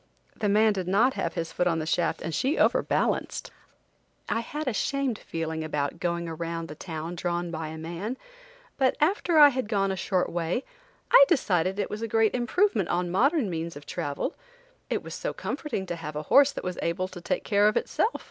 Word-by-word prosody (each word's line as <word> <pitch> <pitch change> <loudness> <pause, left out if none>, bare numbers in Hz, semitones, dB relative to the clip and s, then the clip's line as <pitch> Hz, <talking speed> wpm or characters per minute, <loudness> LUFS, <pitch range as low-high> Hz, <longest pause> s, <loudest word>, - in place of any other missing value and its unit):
The 210 - -1
man 215 +1 +4
did 185 -3 -3
not 225 +8 +3
have 170 - -3
his 165 0 -3
foot 180 - 0
on 165 -2 +1
the 155 - -2
shaft 165 +1 0
and 165 - -3
she 270 - +1
overbalanced. - - +1 0.8
I - - 0
had 295 +5 -5
a 255 - +1
shamed 270 +1 -1
feeling 160 -1 -4
about 150 +1 -2
going 170 -1 -1
around 165 0 -4
the - - -6
town 160 +1 -6
drawn 175 0 -2
by 160 -1 -4
a 160 +1 -7
man, 175 +10 -5 0.6
but 265 -1 +2
after 345 +1 +2
I 295 -1 +10
had 260 -4 -2
gone 195 -3 +1
a - - -1
short 185 0 0
way, 175 +8 -1 0.5
I - - +10
decided 190 - +1
it 205 - -2
was 210 - -4
a 230 - -2
great 225 0 +2
improvement 245 - +1
on 175 0 0
modern 270 - +3
means 170 -2 -4
of 145 0 -10
travel; 145 0 -3 0.6
it - - -1
was - - -7
so - - -3
comforting 290 -10 -4
to 175 - -4
have 155 -2 -7
a 150 - -3
horse 280 0 +7
that - - -6
was 180 -1 -4
able 185 +2 -1
to 180 -1 -9
take - - -2
care 205 -1 +3
of 215 - +2
itself! 450 - 0
185 Hz, 205 wpm, -27 LUFS, 165-245 Hz, 0.8 s, I